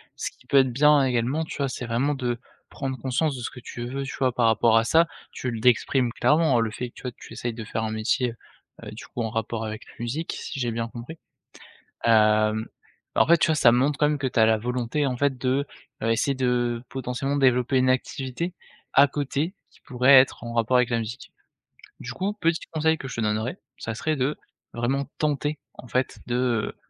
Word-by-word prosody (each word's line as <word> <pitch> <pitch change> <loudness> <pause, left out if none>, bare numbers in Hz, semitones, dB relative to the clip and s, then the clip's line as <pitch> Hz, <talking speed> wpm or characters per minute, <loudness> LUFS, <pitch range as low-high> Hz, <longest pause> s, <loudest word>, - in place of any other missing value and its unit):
ce - - -4
qui 125 - -26
peut 140 - +3
être 130 -2 +4
bien, 150 +2 +5
également, 130 +5 0
tu - - -7
vois, 140 -2 0
c'est 125 0 -5
vraiment 125 +5 0
de 120 -3 -2 0.3
prendre 135 -1 -4
conscience 135 +4 0
de - - -6
ce - - -4
que 125 - -11
tu 120 0 -7
veux, 135 +3 -4
tu 135 - -6
vois, 130 -1 +2
par 120 -1 +2
rapport 115 0 +4
à - - +1
ça. 165 +8 +4 0.3
Tu 125 - -4
le 115 - -4
d'exprimes 125 +1 +2
clairement, 150 0 +3
heu, - - +3
le 115 -1 -1
fait 125 +3 -5
que, - - -28
tu - - -12
vois, 125 - -3
tu 115 - -15
essayes 115 +1 -3
de 110 0 -7
faire 110 0 -3
un 110 - -2
métier, 115 +3 0 0.5
heu, - - -7
du - - -9
coup, 120 - -6
en 115 - -1
rapport 110 0 -3
avec 110 0 -6
la - - -16
musique, 125 +8 -3
si 140 - -6
j'ai 120 -2 0
bien 115 0 -2
compris, 120 +8 -9 0.9
hem, 110 -1 +4 0.5
en - - +4
fait, 170 - +7
tu 165 - +3
vois, 160 - +3
ça 140 -5 +6
montre, 135 +5 +2
quand 150 - +4
même, 150 -1 0
que 140 - -2
tu 120 -3 +1
as 110 - +6
la 110 0 +3
volonté, 125 +5 -1
en 130 -2 -1
fait, 135 0 0
de, 130 +3 +1 0.4
heu, 115 - +1
essayer 125 +5 +1
de, 120 -2 0
potentiellement, 130 +2 -3
développer 130 -1 +3
une 130 0 +3
activité 130 +6 -2 0.4
à 140 - +7
côté 145 +5 -2 0.2
qui - - -24
pourrait 130 +1 +4
être 130 - -1
en 115 0 -6
rapport 115 +2 +2
avec 125 -1 +2
la 120 - +1
musique. 115 +2 -6 0.7
Du 125 - -6
coup, 195 +7 -1
petit 165 -5 0
conseil 160 0 +2
que 135 - -7
je - - -7
te - - -1
donnerais, 110 - -1 0.2
ça 115 - -4
serait 155 +7 -1
de 135 +2 -1 0.3
vraiment 130 +4 -1
tenter, 150 0 0 0.2
en 125 - -12
fait, 130 +2 -1
de, 120 - -1
heu, 120 -4 0
125 Hz, 230 wpm, -25 LUFS, 115-140 Hz, 0.9 s, fait